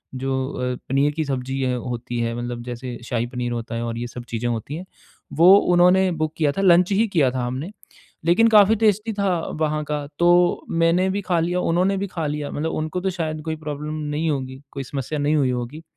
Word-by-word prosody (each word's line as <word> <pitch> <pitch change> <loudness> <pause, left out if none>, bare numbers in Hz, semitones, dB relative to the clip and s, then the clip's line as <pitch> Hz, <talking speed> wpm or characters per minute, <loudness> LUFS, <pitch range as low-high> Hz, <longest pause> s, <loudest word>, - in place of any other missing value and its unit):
जो 130 0 -1
अ, 125 0 -2
पनीर 140 +2 +2
की 160 +1 -1
सब्ज़ी 135 -1 -3
है 125 -1 0
होती 120 0 -4
है 115 0 -1
मतलब 120 0 -5
जैसे 125 0 -6
शाही 115 0 -1
पनीर 125 -1 -4
होता 115 0 -4
है 115 - -2
और 115 -1 -3
ये 120 +1 -3
सब 120 0 -8
चीज़ें 120 +1 -2
होती 115 +5 -4
हैं। 175 +3 -7 0.5
वो 180 +4 +7 0.2
उन्होंने 180 +1 +5
बुक 155 0 -1
किया 150 -3 +2
था 195 - +1
लंच 180 0 +5
ही 215 +3 +3
किया 140 -7 +3
था 125 -1 -2
हमने। 130 +10 -4 0.5
लेकिन 180 +7 +5
काफ़ी 210 0 +6
टेस्टी 215 0 +1
था 200 -1 0 0.3
वहाँ 150 0 0
का, 150 -1 -3
तो 175 +1 +4
मैंने 170 +3 +2
भी 200 +1 -1
खा 175 -3 0
लिया, 175 +2 0
उन्होंने 180 +3 +1
भी 200 +1 -2
खा 170 -4 -4
लिया, 150 0 -3
मतलब 160 +2 -2
उनको 155 +3 -3
तो 190 - 0
शायद 155 -3 -3
कोई 160 -1 -2
प्रॉब्लम 150 0 -5 0.2
नहीं 160 +2 0
होगी, 130 -2 -3
कोई 140 -1 -5
समस्या 140 +3 -4
नहीं 145 +2 +2
हुई 140 -4 +2
होगी। 125 +6 -5
150 Hz, 220 wpm, -22 LUFS, 125-175 Hz, 0.5 s, वो